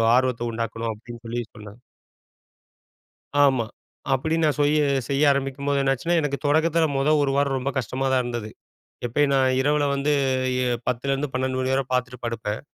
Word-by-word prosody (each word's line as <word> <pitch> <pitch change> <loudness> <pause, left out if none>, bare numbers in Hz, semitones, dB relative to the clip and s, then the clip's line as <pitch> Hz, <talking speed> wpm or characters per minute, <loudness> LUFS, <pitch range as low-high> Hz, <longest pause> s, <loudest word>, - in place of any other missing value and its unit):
ஆர்வத்தை 125 -2 +1
உண்டாக்கணும்?" 115 0 -3
அப்படீன்னு 120 +2 -11
சொல்லி 120 +1 -2
சொன்னாங்க. 105 +1 -11 1.7
ஆமா. 130 -5 +2 0.5
அப்படி 160 +5 -1
நான் 150 -1 +2
சுய்ய 150 +1 +3 0.3
செய்ய 140 +2 +2
ஆரம்பிக்கும்போது 140 +1 -1
என்னாச்சுன்னா, 135 +6 +1
எனக்கு 145 -2 -2
தொடக்கத்தில 160 +2 +3
முதல் 150 +2 +3
1 140 - +1
வாரம் 140 -1 +1
ரொம்ப 135 +2 -2
கஷ்டமா 130 +2 -2
தான் 130 -1 +3
இருந்தது. 120 -3 -4 0.6
எப்பயும் 140 +4 +1
நான் 130 -1 +3
இரவில 145 +1 +2
வந்து 140 +2 0 0.5
இ - - 0 0.3
10 125 +1 -1
லேருந்து 135 +1 -1
12 130 0 -1
மணி 130 0 0
வரை 135 0 +2
பார்த்துட்டு 125 0 -1
படுப்பேன். 115 -2 -3
135 Hz, 155 wpm, -24 LUFS, 120-145 Hz, 1.7 s, சுய்ய